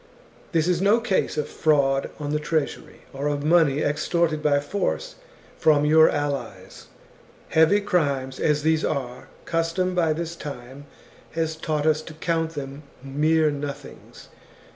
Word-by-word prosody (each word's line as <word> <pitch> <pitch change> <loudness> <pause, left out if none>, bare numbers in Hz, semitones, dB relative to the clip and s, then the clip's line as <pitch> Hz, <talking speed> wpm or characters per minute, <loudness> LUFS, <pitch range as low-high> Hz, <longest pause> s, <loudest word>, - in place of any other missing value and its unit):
This 165 -2 +1
is 180 -1 +1
no 205 +4 +4
case 225 -5 -1
of 150 - -1
fraud 140 -3 +1
on 145 -1 -4
the 150 - 0
treasury, 150 -1 -3
or 140 +2 -3
of 145 -1 -1
money 155 -3 +3
extorted 155 +1 0
by 145 -2 +3
force 205 - -3 0.5
from 150 -2 +4
your 160 +1 +6
allies. 135 -10 -4 0.6
Heavy 160 +6 +4
crimes 140 -9 -1
as 150 -1 +1
these 160 0 +2
are, 125 -3 -3 0.2
custom 165 +2 -1
by 165 -3 +2
this 165 +1 -5
time 140 -2 -9 0.5
has 160 -1 -1
taught 155 -2 -2
us 155 0 +2
to 155 0 -11
count 165 0 -2
them 140 0 -6 0.2
mere 155 +3 +2
nothings. 145 -1 -8
155 Hz, 140 wpm, -24 LUFS, 145-165 Hz, 0.6 s, your